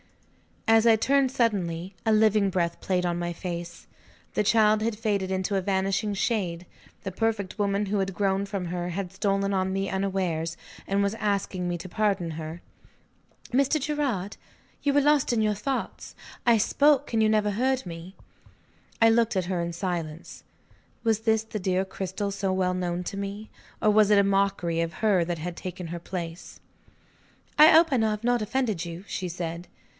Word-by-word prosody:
As 225 +1 +5
I 225 - +7
turned 270 +3 +2
suddenly, 190 -7 -1
a - - +5
living 215 -2 +4
breath 170 -2 -1
played 180 -1 0
on 175 0 -1
my 175 0 -2
face. 170 -1 -6 0.5
The - - +1
child 215 0 +4
had 220 -1 -1
faded 205 -4 -1
into 190 +1 -1
a - - 0
vanishing 195 +2 0
shade: 185 -5 -1 0.4
the 195 - -4
perfected 215 0 -2
woman 200 0 +1
who 200 +1 0
had 195 0 -1
grown 195 0 +1
from 195 -3 -4
her 175 0 -3
had 180 0 -4
stolen 195 0 0
on 190 0 0
me 195 0 -1
unawares, 185 -4 -1 0.3
and 200 +1 +1
was 200 +1 0
asking 200 -4 -1
me 175 0 -1
to 180 +2 -9
pardon 195 -4 0
her. 160 +2 -7 0.9
"Mr. 275 +4 +2
Gerard, 265 -10 -2 0.4
you 285 - +1
were 285 - +4
lost 290 -3 +3
in 225 - +2
your 215 -1 +2
thoughts; 255 +6 -4 0.3
I 235 -1 +6
spoke, 285 +5 +3
and 225 - +3
you 215 - +4
never 210 -1 +2
heard 260 +4 0
me." 170 +2 -8 0.9
I 225 - +7
looked 230 -1 +2
at 185 -2 0
her 180 -1 -1
in 170 0 -3
silence. 170 -3 -5 0.6
Was 225 -2 +2
this 220 -1 +1
the 220 -1 -5
dear 185 0 0
Cristel 190 +1 -4
so 195 -1 -1
well 185 -1 +1
known 180 -1 -2
to 195 - -5
me? 200 +2 -6 0.3
Or 215 - +4
was 210 -1 +5
it 210 - +5
a 200 - +6
mockery 195 -4 +1
of 165 0 -2
her 200 -6 +2
that 175 0 -3
had 170 +2 -5
taken 180 -1 -6
her 170 +1 -5
place? 170 -1 -7 1.0
"I 305 - +10
hope 325 0 +6
I 265 - +3
have 215 -1 0
not 245 -1 +2
offended 215 -6 -1
you?" 170 +2 -7
she 185 - -4
said. 170 0 -5
195 Hz, 180 wpm, -26 LUFS, 180-220 Hz, 1.0 s, I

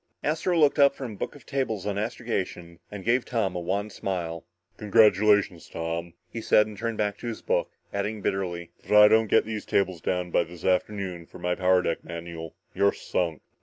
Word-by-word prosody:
Astro 165 +4 0
looked 150 -1 +4
up 140 0 +6
from 130 -5 -6
a - - -8
book - - -5
of 145 - -15
tables 120 -8 -2
on 105 -1 -1
astrogation 95 -6 -4
and 100 -2 -8
gave 120 +2 +3
Tom 110 -7 -1
a - - -1
wan 100 +5 -2
smile. 85 -4 -4 0.3
"Congratulations, 105 -4 +3
Tom," 85 +1 -4
he 115 - -6
said, 105 -1 +4
and 105 0 -9
turned 115 +2 -3
back 105 -1 -1
to 120 - -6
his 115 - -5
book, - - 0 0.2
adding 105 +2 -2
bitterly, 85 -3 -2
"but - - -28
if - - -8
I 105 0 +10
don't 110 0 +4
get - - +4
these 110 -1 -4
tables 95 -4 0
down 90 +1 -1
by 85 - +3
this 85 0 -11
afternoon 90 -2 -1
for - - -12
my 90 0 -1
power 90 0 +3
deck 85 - -2
manual, 85 -1 -7 0.2
you're 100 0 +3
sunk." 85 -5 -2
100 Hz, 205 wpm, -26 LUFS, 90-110 Hz, 0.3 s, I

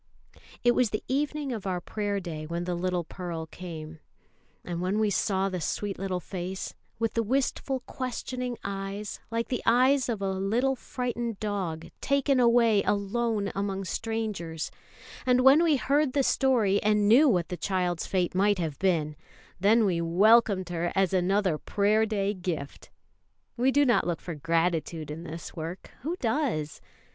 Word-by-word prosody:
It 240 - +6
was 245 -3 +2
the 215 - -3
evening 290 +1 -1
of 215 -5 -4
our 180 -1 -1
Prayer 205 +2 -2
day 160 -4 -6
when 170 +2 -3
the 180 0 -2
little 180 0 -1
Pearl 170 -1 -5
came; 160 -2 -8 0.7
and 175 -1 -3
when 185 +3 0
we 215 -1 +2
saw 195 0 +1
the 185 -2 -3
sweet 200 +5 -3
little 190 -2 -2
face, 185 +1 -5 0.2
with 225 -1 -1
the 230 - +1
wistful, 265 +2 -1
questioning 250 -1 -4
eyes 195 +1 -5
like 230 0 -2
the 250 - -1
eyes 255 +3 +4
of 225 -4 -1
a 195 -1 -1
little 220 +8 +1
frightened 240 -3 -4
dog 190 -7 -3
taken 275 -1 +2
away 235 -3 +5
alone 205 +1 0
among 195 -1 -2
strangers, 210 -8 -3 0.5
and 250 0 +3
when 270 +5 +7
we 320 -3 +4
heard 280 +1 +1
the 280 - +2
story, 230 -8 +2
and 210 -1 +3
knew 265 +8 +7
what 180 -7 +1
the 180 - -3
child's 180 -2 -1
fate 180 -2 0
might 200 +2 +3
have 160 -5 -3
been, 160 -6 +1 0.4
then 215 +4 +4
we 175 -4 +1
welcomed 195 +2 +4
her 175 0 -1
as 190 -1 +2
another 185 -2 +2
Prayer 215 +2 +2
day 205 -2 0
gift. 175 -7 -5 0.7
We 250 +2 +2
do 285 +1 +4
not 230 -9 +3
look 170 -2 -1
for 175 - -6
gratitude 165 0 -1
in 165 +3 -7
this 165 +3 -8
work; 165 +2 -6
who 320 +7 -2
does? 225 - -1
200 Hz, 165 wpm, -28 LUFS, 175-235 Hz, 0.7 s, when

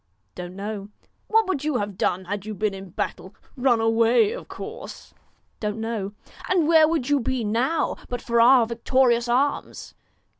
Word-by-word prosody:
' 100 -1 -46
Don't 180 - -8
know.' 200 0 -5 0.4
'What 445 0 +3
would 305 -7 -1
you 300 -4 0
have 205 -2 -3
done 185 +1 -1
had 200 +1 -4
you 215 0 -6
been 210 0 -1
in 195 -1 -9
battle? - - -5 0.2
Run 250 -3 +2
away, 230 - +3
of - - -7
course.' - - -9 0.2
' - - -43
Don't 210 0 -3
know.' 220 -3 -3 0.4
'And 355 -4 +2
where 320 -1 +6
would 310 -5 -1
you 290 -1 +3
be 255 0 -1
now, 240 +10 0
but 245 - -3
for 235 0 +1
our 245 0 +6
victorious 235 +1 +2
arms 270 +4 -1
235 Hz, 180 wpm, -24 LUFS, 210-270 Hz, 0.4 s, where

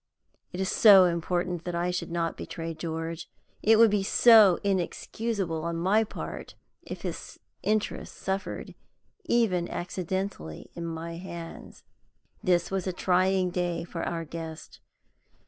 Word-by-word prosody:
It 180 - -6
is 190 0 0
so 195 -4 +8
important 175 0 -1
that 175 -1 -4
I 175 +1 0
should 180 - -3
not 170 -1 -1
betray 165 -1 -6
George 165 0 -5 0.3
it 225 +1 +5
would 225 -1 +6
be 205 -1 +2
so 210 -2 +7
inexcusable 195 -2 -2
on 170 0 -2
my 195 +6 +3
part 220 - -7 0.3
if - - -8
his - - -6 0.2
interests 215 0 -2
suffered, 190 0 -4 0.5
even 185 -8 +1
accidentally, 180 - -4
in 170 -1 -5
my 165 +1 -5
hands. 170 -2 -9 0.6
This 180 -3 +2
was 195 -1 -2
a 185 - -1
trying 185 0 +2
day 175 -1 -1
for 170 - -6
our 165 -1 -3
guest. 160 0 -8
180 Hz, 135 wpm, -28 LUFS, 170-195 Hz, 0.6 s, so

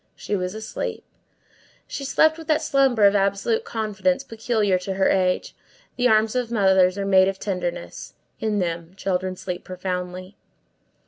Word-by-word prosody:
She 210 - -3
was 180 +1 -3
asleep. 220 0 -5 0.8
She 280 - -6
slept 315 +4 +3
with 320 - -10
that 310 0 +2
slumber 270 -7 +3
of 200 - +6
absolute 200 +3 +1
confidence 225 +5 -1
peculiar 220 -5 0
to 190 +1 -4
her 190 - +2
age. 185 -1 0 0.4
The 250 0 +2
arms 220 0 +3
of 245 -2 -1
mothers 190 -3 +3
are 200 - -2
made 190 -1 +5
of 195 0 -2
tenderness; 175 - -5 0.2
in 215 -2 -1
them 170 -1 -3
children 185 -1 -2
sleep 180 -1 -6
profoundly. 185 +1 -5
195 Hz, 150 wpm, -23 LUFS, 185-225 Hz, 0.8 s, of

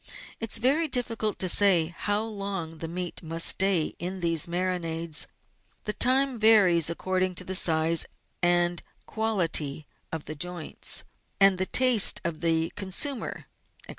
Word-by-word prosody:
It 225 -2 -5
is - - +3
very 280 +8 +1
difficult 230 -5 -3
to 185 - -2
say 175 -3 +4
how 205 +1 -2
long 195 -7 -7
the 165 - -6
meat 175 +1 -6
must 165 0 -1
stay 190 -4 +2
in 185 +2 -4
these 165 -3 +1
marinades; 170 -3 -3 0.6
the 210 - -2
time 260 +1 +1
varies 195 -7 +4
according 185 +2 -2
to 185 - -5
the 185 - -5
size 165 -2 +2 0.3
and 175 -1 +1 0.2
quality 170 -10 -1 0.3
of 160 -2 -6
the 155 - -6
joints, 175 +1 -1 0.4
and 195 -2 +4
the 185 - -1
taste 250 -5 +6
of 170 -2 -4
the 165 -1 -1
consumer, 210 +8 -3 0.4
&c. - - -22
180 Hz, 145 wpm, -25 LUFS, 165-210 Hz, 0.6 s, taste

